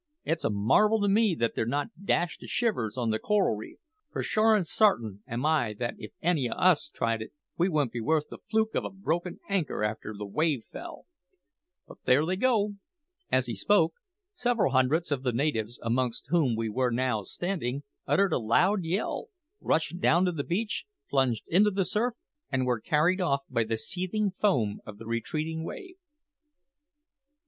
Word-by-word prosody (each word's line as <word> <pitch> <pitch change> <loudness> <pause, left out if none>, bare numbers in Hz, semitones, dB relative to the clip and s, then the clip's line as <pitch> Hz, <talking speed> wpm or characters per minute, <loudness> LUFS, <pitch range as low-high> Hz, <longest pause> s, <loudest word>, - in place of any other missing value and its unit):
It's 165 0 -1
a - - +2
marvel 130 - +3
to 205 - +2
me 205 -2 +3
that 115 -5 0
they're - - 0
not 145 +8 -3
dashed 175 -3 +1
to - - -10
shivers 125 - -1
on 120 -3 0
the 110 - 0
coral 210 - +2
reef, 105 - -9 0.3
for - - -3
sure 220 +1 +4
an' 205 - +2
sart'in 120 - +2
am 120 +4 -3
I 145 -9 +2
that 120 0 -2
if 105 - -8
any 160 -8 +2
o' - - -2
us 180 -5 +3
tried 115 -4 -1
it, 110 - -7 0.2
we 175 +3 +2
wouldn't 150 -7 +1
be 120 - -4
worth 150 +6 +1
the - - -8
fluke 220 0 +1
of - - 0
a - - -3
broken 180 -2 -3
anchor 180 - -1
after 105 0 -3
the 105 - -5
wave 140 +4 0
fell. - - -9 0.8
But - - -13
there 135 +5 +4
they 185 +3 0
go!" 210 -2 +1 0.5
As 130 0 +3
he 120 -2 -4
spoke, 165 - +3 0.4
several 245 - +1
hundreds 140 +6 +2
of 140 -3 0
the 125 -2 0
natives, 120 -3 -1
amongst 120 +1 -1
whom 155 -9 +3
we 115 0 -1
were 125 +4 +1
now 120 -2 0
standing, 145 - -3 0.2
uttered 200 -1 +3
a - - +2
loud 180 - +2
yell, 185 - -2 0.3
rushed 160 +2 0
down 175 0 +4
the 165 -6 -1
beach, 205 +7 -2 0.3
plunged 130 -5 +2
into 200 +5 +4
the 195 -2 0
surf, 230 +5 0 0.4
and 130 -2 +1
were 120 -3 0
carried 165 - +2
off 140 -6 +1
by 115 - +2
the 110 0 -2
seething 190 - -1
foam 130 - +1
of 105 -1 -10
the 115 - -10
retreating 155 +8 -2
wave. 365 - -8
155 Hz, 185 wpm, -28 LUFS, 120-190 Hz, 0.8 s, sure